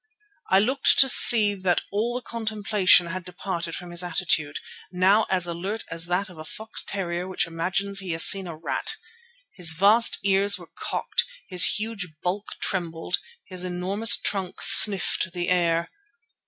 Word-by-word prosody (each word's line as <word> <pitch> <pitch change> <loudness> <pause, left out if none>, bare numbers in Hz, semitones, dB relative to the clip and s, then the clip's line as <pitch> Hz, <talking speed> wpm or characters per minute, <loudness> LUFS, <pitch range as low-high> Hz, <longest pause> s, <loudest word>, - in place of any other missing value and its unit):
I 190 - +4
looked 260 +7 +2
to 270 - +6
see 220 -5 +7
that 185 -3 -1
all 225 +4 -2
the 250 - -5
contemplation 215 -5 +1
had 175 +2 -7
departed 175 -2 -6
from 180 -1 -9
his 175 0 -1
attitude, 170 -4 -1 0.3
now 190 +4 +2
as 185 -2 +1
alert 185 +6 -5
as 165 +1 -1
that 180 +3 -2
of 180 -5 -15
a - - -8
fox 220 +7 -4
terrier 180 -2 -5
which 190 0 -1
imagines 185 +4 -2
he 190 -2 -7
has 165 - +2
seen 195 -2 +5
a 165 - -8
rat. 440 - -2 0.6
His 170 -4 +2
vast 205 +7 +3
ears 200 +1 +2
were - - -15
cocked, - - -2 0.2
his 180 -2 -1
huge 210 -7 -6
bulk 195 +4 -4
trembled, 175 -2 -4 0.3
his 185 -1 -7
enormous 185 +3 0
trunk 190 -3 -3
sniffed 185 -2 +5
the 175 -1 -4
air. 170 -2 0
185 Hz, 160 wpm, -23 LUFS, 175-205 Hz, 0.6 s, see